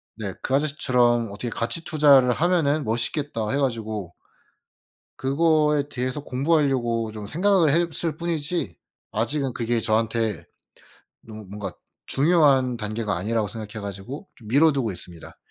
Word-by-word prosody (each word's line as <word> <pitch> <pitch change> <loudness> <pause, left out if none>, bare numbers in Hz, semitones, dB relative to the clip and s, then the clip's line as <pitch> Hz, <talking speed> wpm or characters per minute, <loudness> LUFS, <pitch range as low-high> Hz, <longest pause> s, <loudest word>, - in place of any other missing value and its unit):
네. 105 -3 -5
그 130 - -3
아저씨처럼 125 -5 +2
어떻게 110 +4 -5
가치 120 +9 -2
투자를 145 -6 +5
하면은 155 -1 +2
멋있겠다 115 0 -2
해 140 - +1
가지고 110 -8 -2 1.0
그거에 150 +1 +2
대해서 130 +2 -3
공부하려고 130 -6 +1
좀 105 -1 -7
생각을 180 - +3
했을 165 +1 0
뿐이지 170 0 -2 0.4
아직은 130 +4 -1
그게 115 -1 -1
저한테 110 0 0 0.8
너무 110 -1 -10
뭔가 100 -1 -6 0.3
중요한 140 -5 +3
단계가 105 -2 -2
아니라고 105 +3 -1
생각해 110 0 -7
가지고 100 - -7
좀 110 - -14
미뤄 150 +7 +5
두고 125 -7 -1
있습니다. 85 -2 -7
125 Hz, 320 characters per minute, -24 LUFS, 110-150 Hz, 1.0 s, 투자를